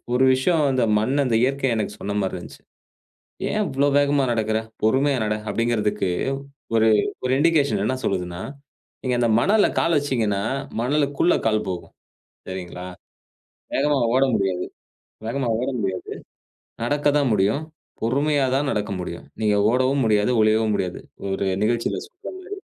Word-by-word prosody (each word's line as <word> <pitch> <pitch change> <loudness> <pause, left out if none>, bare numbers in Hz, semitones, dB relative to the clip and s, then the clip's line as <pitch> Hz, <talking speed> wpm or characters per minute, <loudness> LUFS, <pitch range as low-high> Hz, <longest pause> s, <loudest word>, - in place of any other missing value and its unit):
ஒரு 130 - +4
விஷயம் 155 +4 +2
அந்த 130 -1 +1 0.2
மண், 115 +6 0
அந்த 120 -3 0
இயற்கை 135 +1 +1
எனக்கு 105 -1 -2
சொன்ன 100 +1 -3
மாரி 95 - -2
இருந்துச்சு. - - -12 0.9
ஏன் 215 0 +1
இவ்ளோ 140 +2 +1
வேகமா 145 -1 +2
நடக்குற? 110 -1 0 0.3
பொறுமையா 135 +5 +3
நட. 105 0 0 0.2
அப்டிங்கறதுக்கு 105 -4 0 0.7
ஒரு 110 0 +4 0.4
ஒரு 130 - +1
இன்டிகேஷன் 145 -9 +2
என்ன 130 - 0
சொல்லுதுன்னா, 90 -1 -2 0.6
நீங்க 130 -2 0
அந்த 120 - +2
மணல்ல 205 - +4
கால் 165 -1 +2
வச்சீங்கன்னா, 115 -8 0 0.4
மணலுக்குள்ள 145 +6 +2
கால் 110 -1 +1
போகும். 90 -2 -6 0.6
சரிங்களா? 90 -1 -6 0.9
வேகமா 150 - +2 0.2
ஓட 130 +1 +4
முடியாது 95 -3 0 0.6
வேகமா 125 +1 -1
ஓட 130 - -2
முடியாது, 95 -3 -3 0.7
நடக்கத்தான் 145 +2 +2
முடியும். 105 +8 +2 0.4
பொறுமையா 140 +4 +1
தான் 140 +1 +1
நடக்க 105 -1 -2
முடியும். 85 -1 -6 0.2
நீங்க 105 -1 +2
ஓடவும் 130 +2 +2
முடியாது. 105 +1 +2
ஒளியவும் 110 0 +3
முடியாது. 90 -3 -2 0.3
ஒரு 95 0 -1 0.2
நிகழ்ச்சில 115 +2 0
சொல்ற 360 - -11
மாரி. 375 +1 -12
120 Hz, 140 wpm, -23 LUFS, 105-140 Hz, 0.9 s, ஒரு